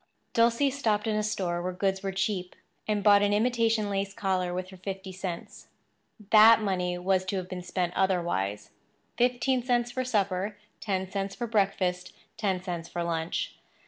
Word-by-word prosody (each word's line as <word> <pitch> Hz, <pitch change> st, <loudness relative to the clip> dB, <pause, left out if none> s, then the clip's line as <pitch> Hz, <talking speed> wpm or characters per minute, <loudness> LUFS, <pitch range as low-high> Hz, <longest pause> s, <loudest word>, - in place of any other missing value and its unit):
Dulcie 235 Hz, +4 st, +3 dB
stopped 220 Hz, -7 st, 0 dB
in 220 Hz, -1 st, 0 dB
a 215 Hz, -, +1 dB
store 185 Hz, -5 st, -1 dB
where 180 Hz, +1 st, -3 dB
goods 190 Hz, +1 st, 0 dB
were 195 Hz, 0 st, -2 dB
cheap 190 Hz, -1 st, -2 dB, 0.3 s
and 210 Hz, -2 st, 0 dB
bought 205 Hz, -1 st, +6 dB
an 205 Hz, 0 st, +2 dB
imitation 225 Hz, -1 st, +2 dB
lace 195 Hz, 0 st, -2 dB
collar 185 Hz, -2 st, 0 dB
with 185 Hz, +1 st, -4 dB
her 190 Hz, -, -11 dB
fifty 190 Hz, 0 st, -6 dB
cents. 185 Hz, -2 st, -6 dB, 0.6 s
That 220 Hz, +1 st, +8 dB
money 180 Hz, -4 st, -1 dB
was 185 Hz, +1 st, +1 dB
to 190 Hz, -, -2 dB
have 185 Hz, -1 st, -3 dB
been 185 Hz, -1 st, -6 dB
spent 180 Hz, 0 st, -2 dB
otherwise—fifteen 190 Hz, -, -1 dB
cents 240 Hz, -1 st, +1 dB
for 255 Hz, +1 st, -2 dB
supper, 200 Hz, -4 st, -1 dB, 0.2 s
ten 190 Hz, -3 st, -2 dB
cents 195 Hz, 0 st, -3 dB
for 240 Hz, -, -3 dB
breakfast, 195 Hz, -5 st, 0 dB, 0.2 s
ten 190 Hz, -4 st, -1 dB
cents 175 Hz, -3 st, -5 dB
for 175 Hz, -, -3 dB
lunch. 165 Hz, -1 st, -2 dB
195 Hz, 165 wpm, -28 LUFS, 180-215 Hz, 0.6 s, That